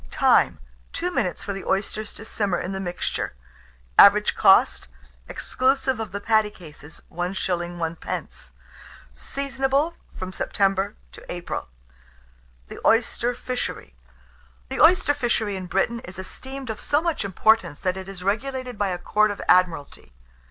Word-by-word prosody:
Time. - - +3 0.4
2 355 +1 -2
minutes 180 - -1
for 200 - -3
the 195 - -6
oysters 205 +2 -2
to 220 - -11
simmer 205 -5 -1
in 185 - -4
the 190 - -3
mixture. 175 - -3 0.6
Average - - +7
cost, - - +4 0.4
exclusive 265 -1 0
of 220 -4 -4
the 200 - -4
patty 215 0 +2
cases, 155 -5 -13
1s. 175 +3 -3
1d. 175 -2 -4 0.6
Seasonable 275 +3 -1 0.2
from 185 0 -5
September 195 +1 0 0.2
to - - -12
April. 175 - -5 1.0
THE - - -10
OYSTER 240 +1 +2
FISHERY. 250 - -4 0.8
The - - -2
oyster 335 -4 +6
fishery 225 -6 0
in 185 -1 -5
Britain 195 +6 0
is 180 -4 -10
esteemed 260 +6 -6
of 215 - -7
so 290 - +1
much 335 -8 -1
importance, 200 -3 +2
that 185 0 0
it 190 0 -7
is 185 -2 -8
regulated 250 +3 -2
by 205 - +2
a 180 -2 -2
Court 215 +4 +2
of 205 - -5
Admiralty. 175 - +2
205 Hz, 140 wpm, -24 LUFS, 185-245 Hz, 1.0 s, Average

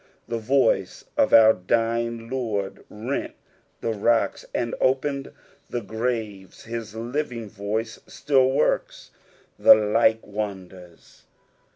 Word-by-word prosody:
The 115 - -3
voice 130 +5 +1
of - - +2
our 110 -1 +8
dying 115 +3 -1
Lord 110 -6 -3
rent 115 +6 -4 0.5
the 115 - -1
rocks 115 +2 +1
and 120 -1 -2
opened 135 +1 0 0.4
the 120 - -3
graves: 110 -3 -4
his 115 -2 -6
living 120 0 -4
voice 110 +3 -4
still 135 -3 +2
works 135 - -1 0.5
the - - +9
like 110 +1 +2
wonders. 95 -4 -8
115 Hz, 105 wpm, -24 LUFS, 105-120 Hz, 0.5 s, the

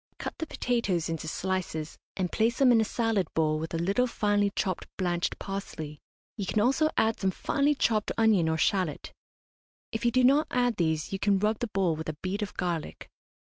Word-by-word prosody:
Cut - - -5
the 320 - -3
potatoes 210 - -1
into 160 -1 -4
slices, 175 -3 -3 0.2
and 185 -2 -1
place 230 +2 +1
them 265 -3 +5
in 230 -2 +5
a - - +3
salad 225 -3 0
bowl 155 -1 +2
with 160 +1 -5
a 165 - -1
little 195 +9 +1
finely 205 -3 +1
chopped 185 -3 -2
blanched 175 -2 -1
parsley. 160 -7 -6 0.3
You 200 -4 -4
can 215 - +1
also 270 +8 +3
add 220 0 +2
some 190 - +1
finely 285 +9 +1
chopped 215 -5 +1
onion 215 -8 +4
or 160 - 0
shallot. 180 -2 0 0.8
If 225 - -4
you 240 - +4
do 255 +2 +2
not 280 +5 +5
add 245 -3 +1
these 160 0 0
you 195 - -2
can 200 0 +3
rub 210 +2 0
the 240 - -1
bowl 195 -6 +1
with 160 0 -5
a 155 - -5
bead 190 +3 -2
of 205 - -4
garlic. 175 -4 -3
195 Hz, 200 wpm, -28 LUFS, 170-225 Hz, 0.8 s, them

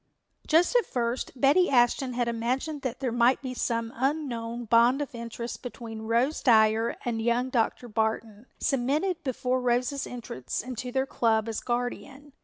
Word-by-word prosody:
Just 335 +9 +3
at 485 - +4
first 240 0 -2
Betty 295 +8 +4
Ashton 250 0 +2
had 240 0 0
imagined 255 +6 -2
that 255 0 -4
there 255 -3 -1
might 240 +2 +3
be 255 -1 -4
some 230 -2 -2
unknown 240 -4 -2
bond 235 +4 +4
of 290 -3 -4
interest 235 0 -6
between 225 -3 -7
Rose 240 +7 +1
Dyer 220 -1 +4
and 230 -2 -1
young 240 +3 +1
Dr. 240 0 0
Barton, 220 0 -2
cemented 300 +7 0
before 255 -1 -1
Rose's 250 +3 0
entrance 225 - -5
into 250 0 -5
their 265 +1 +1
club 225 -4 +1
as 225 -2 -2
guardian. 255 +4 -4
245 Hz, 155 wpm, -27 LUFS, 230-265 Hz, -, at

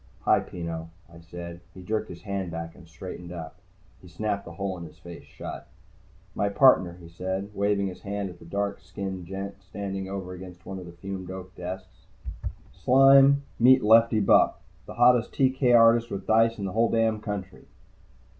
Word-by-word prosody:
"Hi, - - +4
Peno," 85 -1 -6 0.2
I 85 - -12
said. 85 +1 -9 0.2
He 95 - -10
jerked 110 +4 -2
his 85 - -10
hand 100 -3 -3
back 80 0 -6
and 85 - -16
straightened 90 +1 -9
up. 85 -1 -8 0.4
He 90 - -14
snapped 100 +2 -3
the 85 - -9
hole 95 +1 -3
in - - -7
his 80 -2 -12
face 85 -1 -11
shut. - - -8 0.7
"My 100 - 0
partner," 100 -7 +4
he 85 - -12
said, 95 +4 -4
waving 100 0 +1
his 95 -2 -6
hand 100 -2 -4
at 90 - -15
the - - -14
dark 100 +3 -2
skinned 95 -3 -6
gent 100 +1 -6
standing 95 0 -5
over 95 -2 -5
against 90 0 -11
one 95 -1 -6
of 90 - -9
the - - -9
fumed 95 +1 -7
oak 95 0 -8
desks. 95 +1 -8 0.7
"Sime, 135 +2 +6 0.2
meet 130 +2 +6
Lefty 115 +1 +5
Bupp, 100 - +5 0.3
the - - -8
hottest 120 -1 +4
TK 130 -2 +4
artist 115 +1 +5
with 95 -1 -5
dice 115 +2 +3
in 100 - -4
the 95 - -3
whole 115 +3 +2
damned 110 -1 +1
country!" 100 -3 -6
95 Hz, 185 wpm, -26 LUFS, 90-110 Hz, 0.7 s, Sime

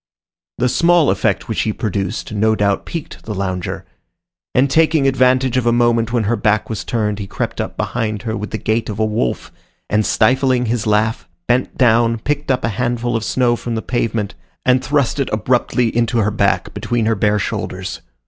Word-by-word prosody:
The 125 - +2
small 170 +4 +4
effect - - 0
which - - -1
he 110 - 0
produced 100 -1 -3
no 110 +1 +2
doubt 100 -1 0
piqued 165 -3 -6
the 105 - -4
lounger; 95 -2 -3 0.7
and 130 +2 +4
taking 160 0 +3
advantage 130 -1 +3
of 120 -2 +1
a - - +5
moment 120 -1 +2
when 120 -2 +1
her 110 +3 +1
back 110 -1 0
was 110 - -3
turned, 105 -3 -1
he 100 - -5
crept - - -3
up - - -6
behind 110 -3 -2
her 110 -2 -2
with 105 -1 -5
the 110 - -3
gait 110 +1 -1
of 105 - -4
a 110 - +1
wolf, 105 - -2 0.4
and 105 +1 +3
stifling 130 +3 +2
his 115 -1 -1
laugh, 110 +2 +1 0.2
bent 125 +1 0
down, 115 -1 +3
picked 145 +5 -3
up 130 -1 +1
a - - +1
handful 120 -1 -1
of 115 - -1
snow 120 0 +2
from 120 0 -4
the 110 - -3
pavement, 115 -4 -1 0.3
and 130 0 +3
thrust 145 -2 0
it 135 - 0
abruptly 120 +1 +1
into 120 0 +1
her 105 -2 +2
back, - - 0
between 120 -2 -1
her 115 - +2
bare 105 0 +1
shoulders. 95 -1 -4
115 Hz, 195 wpm, -18 LUFS, 110-125 Hz, 0.7 s, a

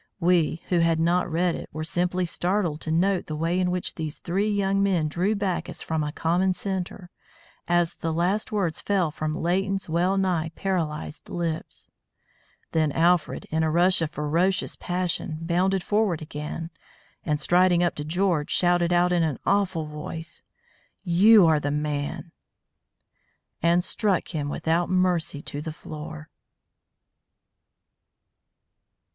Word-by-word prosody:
We, 170 -2 +2
who 175 - +3
had 165 -1 +2
not 175 +2 +1
read 170 +2 +1
it, - - -7
were 155 - -4
simply 180 +2 0
startled 175 -2 -1
to 160 - -3
note 185 +3 +1
the 155 - -4
way 165 +4 0
in 180 -1 +1
which 180 0 -2
these 155 -2 -5
three 195 +5 -1
young 195 -1 +1
men 185 -6 +2
drew 180 +7 0
back 190 -3 -2
as 175 - -6
from 160 -1 -1
a 150 - -3
common 180 +4 +1
centre, 185 -1 -4 0.6
as 175 -1 +2
the 165 - -3
last 180 +6 0
words 190 -7 -1
fell 190 -6 +1
from 155 0 -3
Leighton's 195 +4 0
well 175 +4 +1
nigh 180 -4 0
paralysed 165 -6 -3
lips. 165 -2 -4 0.8
Then 155 -2 +2
Alfred, 170 -1 +2
in 160 +1 +1
a 160 - +2
rush 175 +3 +3
of 160 - 0
ferocious 165 +6 0
passion, 175 -3 -2
bounded 180 +3 +1
forward 205 -6 +1
again, 155 +2 -6 0.5
and 150 -2 0
striding 175 +1 +3
up 175 - +1
to 150 - -5
George, 170 -1 0
shouted 175 -1 +2
out 175 0 +3
in 175 -1 +2
an 155 -5 0
awful 190 -5 +1
voice, 150 +2 -7 0.6
"You 195 +3 +6
are 160 -2 +4
the 145 - -2
man!" 150 +2 -3 1.3
and 170 +2 +3
struck 195 0 0
him 150 -4 -3
without 165 +4 0
mercy 180 -5 +1
to 145 - -5
the 160 +1 -5
floor. 155 0 -9
175 Hz, 145 wpm, -25 LUFS, 160-185 Hz, 1.3 s, You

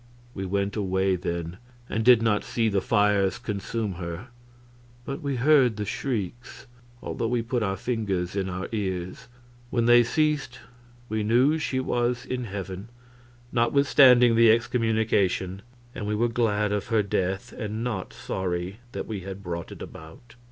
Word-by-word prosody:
We 95 -1 -4
went 100 +1 -1
away 95 -2 +1
then, 85 0 -4 0.3
and 110 - -1
did 120 -1 +6
not 110 -2 +2
see 115 -2 0
the 100 -2 +1
fires 105 -5 +2
consume 105 0 -3
her, 85 +8 -6 0.8
but 140 - -5
we 140 -2 -2
heard 130 -3 +4
the 105 - -2
shrieks, 120 +2 -4 0.4
although 115 - -2
we 120 0 0
put 120 +1 -1
our 95 -2 -1
fingers 100 -7 -2
in 95 -1 -1
our 95 +1 -4
ears. 95 +1 -4 0.4
When 120 -1 +1
they 120 0 +7
ceased 150 -1 0 0.5
we 110 -1 -1
knew 125 +9 +3
she 135 -3 -1
was 125 -1 -1
in 125 -1 -3
heaven, 95 0 -6 0.6
notwithstanding 125 -1 +5
the 115 0 +6
excommunication; 110 -5 +1 0.3
and 105 - -5
we 105 - 0
were 120 +3 +1
glad 105 -3 +1
of 105 -1 -2
her 110 -2 +2
death 95 +4 -2
and 110 0 -4
not 110 -7 -3
sorry 90 +2 -4
that - - -4
we 110 -3 -4
had 95 +1 -8
brought 85 -2 -5
it - - -8
about. 80 +9 -12
110 Hz, 155 wpm, -26 LUFS, 95-120 Hz, 0.8 s, they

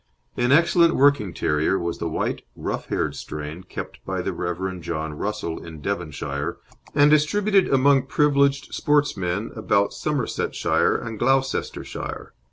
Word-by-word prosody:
An 120 +1 +1
excellent 170 +2 +5
working 140 -8 +4
terrier 80 +3 +1
was 85 -1 -3
the 85 - -2
white, 80 - -2
rough - - -4
haired - - -1
strain 75 +3 -6
kept 95 - -8
by - - -3
the - - -2
Rev. 90 +1 -3
John 80 -1 -3
Russell 100 0 -4
in 80 -2 -9
Devonshire 75 -5 -3 0.4
and 145 +1 +6
distributed 195 +6 +3
among 135 0 +4
privileged 140 -1 +2
sportsmen 105 -9 0
about 100 -2 +1
Somersetshire 145 -6 0
and 110 -2 -4
Gloucestershire. 135 +2 -1
110 Hz, 130 wpm, -23 LUFS, 85-140 Hz, 0.4 s, and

